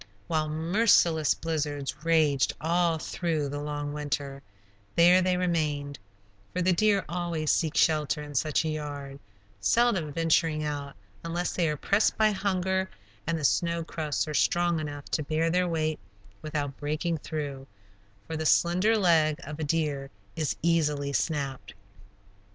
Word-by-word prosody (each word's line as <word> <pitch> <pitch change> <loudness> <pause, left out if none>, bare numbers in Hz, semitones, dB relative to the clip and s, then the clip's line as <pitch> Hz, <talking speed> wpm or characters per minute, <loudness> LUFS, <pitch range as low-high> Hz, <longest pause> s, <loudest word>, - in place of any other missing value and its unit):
While 155 -2 -1
merciless 165 -1 +3
blizzards 150 -2 -3
raged 155 -5 +3
all 170 0 +1
through 155 -2 -2
the 145 +1 -4
long 145 0 -4
winter, 140 -2 -3 0.5
there 175 +2 +6
they 185 0 +1
remained, 150 -6 -1 0.5
for - - -3
the 185 +1 +3
deer 200 +1 +2
always 170 -3 -1
seek 160 -2 0
shelter 150 -1 +2
in 145 0 -9
such 155 +3 +1
a - - 0
"yard," 145 -2 -5 0.4
seldom 185 - +2
venturing 165 0 +1
out, 145 -2 -4 0.3
unless 170 +2 -2
they 170 -3 +1
are 150 - -2
pressed 200 +8 +2
by 215 -1 +4
hunger, 190 -1 -1 0.4
and 165 0 0
the 155 - -5
snow 170 +3 +1
crusts 155 -2 -2
are 155 - -4
strong 175 +2 +2
enough 145 -2 -6
to 155 - +1
bear 160 +3 0
their 180 +1 +2
weight 155 -2 -1 0.4
without 145 -3 -3
breaking 155 +3 -2
through, 145 -4 -5 0.6
for 160 - -5
the 160 - -2
slender 185 +9 +3
leg 160 -6 +3
of 150 +1 -7
a - - -2
deer 145 -3 -1 0.3
is 155 -3 -1
easily 150 -4 +1
snapped. 135 -8 -2
155 Hz, 145 wpm, -28 LUFS, 145-170 Hz, 0.6 s, there